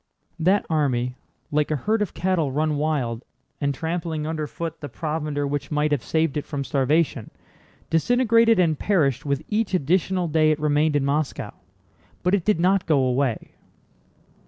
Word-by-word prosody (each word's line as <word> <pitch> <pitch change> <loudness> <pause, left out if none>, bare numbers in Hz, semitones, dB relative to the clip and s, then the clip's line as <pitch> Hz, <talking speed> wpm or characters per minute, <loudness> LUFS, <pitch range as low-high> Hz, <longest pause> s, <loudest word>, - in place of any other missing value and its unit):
That 185 +5 +2
army, 130 -6 0 0.4
like 150 0 +1
a 155 - +1
herd 215 - 0
of 205 - -2
cattle 175 -6 0
run 150 +2 0
wild 135 -6 -1 0.4
and 140 -1 +1
trampling 160 +1 -3
underfoot 160 +1 -4
the 145 - -6
provender 150 +1 -3
which 145 0 -3
might 150 0 0
have 145 -5 0
saved 160 -2 0
it 145 - -2
from 145 -2 -4
starvation, 140 -2 0 0.6
disintegrated 230 +5 +4
and 165 -5 +2
perished 150 - +1
with 140 +1 -1
each 210 -2 0
additional 180 +3 +1
day 155 0 +3
it 155 0 +1
remained 150 0 +2
in 140 -2 +1
Moscow. 145 +1 -1 0.7
But 180 - +1
it 195 -4 +1
did 210 -6 +2
not 185 +1 +2
go 155 -3 +3
away. 130 -2 0
155 Hz, 160 wpm, -23 LUFS, 145-175 Hz, 0.7 s, disintegrated